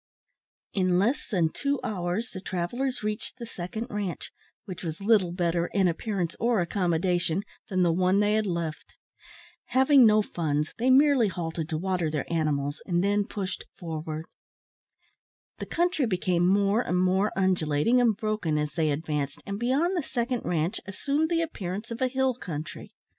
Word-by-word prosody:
In 185 -2 +2
less 230 +9 +1
than 175 -6 +2
two 280 -1 -1
hours 205 0 -2
the 190 - -7
travellers 210 +9 -2
reached 215 +3 -3
the 235 - -6
second 215 +2 -5
ranche, 205 -4 -4 0.3
which 185 -5 -7
was 165 0 -5
little 200 -4 +3
better, 170 -1 0
in 195 -3 +3
appearance 175 0 -2
or 235 -1 +2
accommodation, 175 0 0 0.3
than 185 -2 +2
the 170 -2 +3
one 185 +3 +3
they 210 0 +3
had 215 -1 +1
left. 170 -3 -4 0.7
Having 265 -1 +6
no 215 0 +5
funds, 150 -5 -2
they 250 +3 +2
merely 270 -3 +5
halted 165 -3 -4
to 160 - -1
water 180 -1 0
their 150 -2 -1
cattle, 150 -4 0
and 175 0 +1
then 205 +1 +2
pushed 200 -5 -4
forward. 160 -2 -5 1.3
The - - -5
country 340 -6 +1
became 180 -3 +1
more 200 +3 +3
and 180 - -1
more 190 +3 +2
undulating 185 +4 +2
and 225 -4 +3
broken 215 -8 -1
as 150 0 -1
they 160 -2 +1
advanced, 145 -1 -2
and 200 0 -4
beyond 280 +10 +1
the 345 - +1
second 245 -2 -2
ranche 170 +4 -1
assumed 285 +10 0
the 335 -1 +2
appearance 210 - -5
of 230 - -5
a 260 - +3
hill 265 0 +1
country. 160 -9 -7
190 Hz, 165 wpm, -27 LUFS, 170-230 Hz, 1.3 s, Having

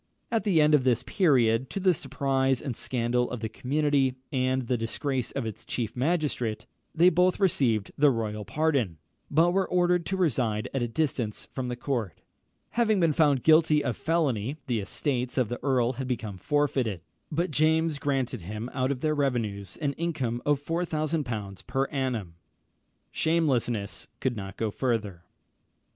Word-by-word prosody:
At 225 -1 0
the 185 -6 +3
end 150 0 +5
of 145 -4 +5
this 125 -1 +2
period, 130 - +2
to - - -3
the 185 -1 +4
surprise 135 -2 0
and 130 -5 -4
scandal 125 0 0
of 120 -1 -5
the 110 - -1
community, 140 0 +1 0.2
and 130 -1 +1
the 125 +1 0
disgrace 125 +3 -2
of 135 -4 -2
its 110 -3 -6
chief 115 -3 -3
magistrate, 125 -6 -1 0.3
they 175 +3 +6
both 180 +2 +3
received 125 - +2
the 145 0 +6
royal 110 -4 -2
pardon, 135 - 0 0.3
but 165 +4 +4
were 190 +1 +1
ordered 180 -1 +2
to 190 - -1
reside 120 - +1
at 135 - 0
a 120 - 0
distance 120 -5 -2
from 130 -2 -3
the 125 - -3
court. 120 - -3 0.5
Having 220 -3 +2
been 165 -3 +3
found 145 -5 +3
guilty 155 -1 +5
of 120 - -1
felony, 145 -5 0
the 120 -3 0
estates 125 +5 -2
of 125 -5 +2
the 120 - -4
earl 130 -3 +2
had 130 0 -5
become 110 -6 -4
forfeited; 135 - 0 0.3
but 170 +2 0
James 155 +1 +2
granted 135 -7 -1
him 105 +7 -6
out 130 -1 0
of 135 -2 -2
their 155 -1 +1
revenues 115 - -2
an 145 -2 0
income 135 -8 -2
of 145 -2 +3
4000l. 150 - -2
per 135 +1 +1
annum! 125 - -2 0.8
Shamelessness 130 - 0
could 130 -2 -1
go 100 -2 -5
no 110 -2 0
further. 105 -8 -2
130 Hz, 165 wpm, -27 LUFS, 115-155 Hz, 0.8 s, they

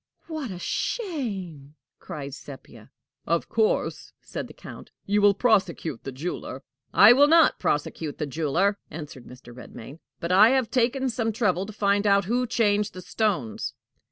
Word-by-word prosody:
"What 315 -6 -5
a 185 - -6
shame!" 190 - -4 0.2
cried 140 -2 -7
Sepia. 135 0 -12 0.4
"Of - - 0
course," 465 +3 0
said - - -7
the - - -13
Count, - - -11 0.2
"you 205 +1 +1
will 205 -1 +5
prosecute 190 - 0
the 135 - -4
jeweler." 145 +8 -6 0.3
"I - - +8
will 285 +3 +6
not 330 +1 +5
prosecute 150 +1 -2
the 150 - -2
jeweler," 165 +8 0
answered 150 -5 -9
Mr. 125 -1 -13
Redmain; 125 +3 -11 0.2
"but 170 - -3
I 200 +4 +7
have 255 -4 -1
taken 260 +2 +1
some 225 -1 -1
trouble 195 -4 0
to - - -7
find 200 0 +1
out 200 -1 +4
who 245 +5 0
changed 210 -3 +1
the 185 - -7
stones." 180 - -2
200 Hz, 155 wpm, -25 LUFS, 155-230 Hz, 0.4 s, I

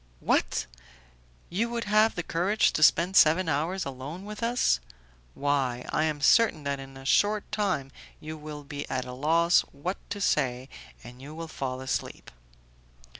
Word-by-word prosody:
"What! - - +1 0.9
you 220 +7 0
would 235 -1 -3
have 215 +1 +3
the 175 - -3
courage 190 +7 +1
to - - -1
spend 170 +4 +4
seven 165 +1 +5
hours 165 +6 -1
alone 140 +7 -7
with 210 +1 -8
us? 230 - +2 0.6
Why, 135 -4 0
I 155 - +1
am 150 -2 -2
certain 210 -3 +4
that 140 -1 -2
in 135 0 -10
a 135 - -12
short 205 +8 +2
time 185 -11 -1 0.3
you 155 +1 -7
will 150 -1 -8
be 145 0 -7
at 130 -1 -2
a 125 - -7
loss 165 +6 +3
what 170 +7 -4
to 205 - -4
say, 130 -8 0 0.3
and 125 +1 -12
you 145 +3 -9
will 165 0 -6
fall 130 -4 -4
asleep." 130 0 -4
155 Hz, 165 wpm, -27 LUFS, 135-190 Hz, 0.9 s, seven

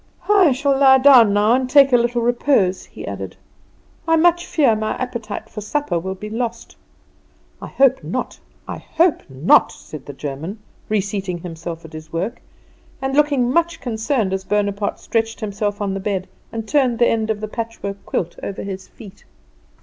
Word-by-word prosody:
"I 385 -7 +6
shall 275 +2 +1
lie 265 -1 +7
down 255 -5 +7
now 205 +3 +3
and 255 0 +1
take 275 -1 +6
a - - +8
little 240 0 +1
repose," 235 -6 +1
he - - -10
added; - - -6 0.7
"I 325 - +4
much 345 +1 +3
fear 270 -8 +3
my 215 0 -2
appetite 235 -5 -5
for 210 - -8
supper 210 - -1
will 190 +3 -4
be 210 +2 -8
lost." 230 +1 -4 0.9
"I - - -6
hope 265 -1 +2
not, - - -4 0.3
I - - -5
hope 330 0 +1
not," 135 +6 +4
said 155 -4 -11
the 145 - -7
German, 145 - -6 0.3
reseating 200 -3 -1
himself 165 -1 -7
at 160 - -13
his 155 +1 -10
work, 185 +8 -3 0.6
and 270 0 -2
looking 285 -4 +3
much 340 +3 +1
concerned 225 -3 -1
as 190 0 -2
Bonaparte 205 0 -1
stretched 225 0 -1
himself 205 -1 -3
on 195 -1 -1
the 195 - -3
bed 190 -1 -2 0.2
and 225 -1 -5
turned 260 -4 +2
the 240 - +4
end 220 -1 0
of 215 -1 -1
the 215 - -4
patchwork 215 -3 -6
quilt 170 -1 -3
over 195 - -5
his 190 -1 -6
feet. 205 -2 -14
220 Hz, 175 wpm, -20 LUFS, 195-260 Hz, 0.9 s, a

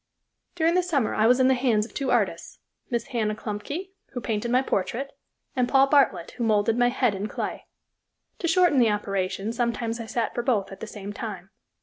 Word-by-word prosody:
During 330 0 +2
the 365 - +4
summer 300 -10 0
I 215 +1 +3
was 250 +2 +5
in 260 - +5
the 265 - +5
hands 240 -5 +2
of - - -14
two 275 -2 -2
artists, - - 0 0.3
Miss 235 -3 -2
Anna 215 -3 0
Klumpke, 285 - -5 0.2
who 245 - -3
painted 220 +1 -2
my 250 +2 +3
portrait, 240 +6 -2 0.4
and 250 -2 +1
Paul 270 0 +6
Bartlett, 280 -2 +3
who 240 - -2
molded 220 0 +2
my 245 0 +3
head 245 -3 +1
in 200 +2 -3
clay. - - -5 0.7
To 340 - -1
shorten 350 -5 +4
the 235 -3 +5
operation, 200 0 -2
sometimes 235 -1 -1
I 230 - -6
sat 230 0 -1
for 240 - -1
both 230 -6 0
at 195 - -9
the 225 - -6
same 205 -1 -7
time. 195 -4 -7
235 Hz, 205 wpm, -25 LUFS, 210-265 Hz, 0.7 s, Paul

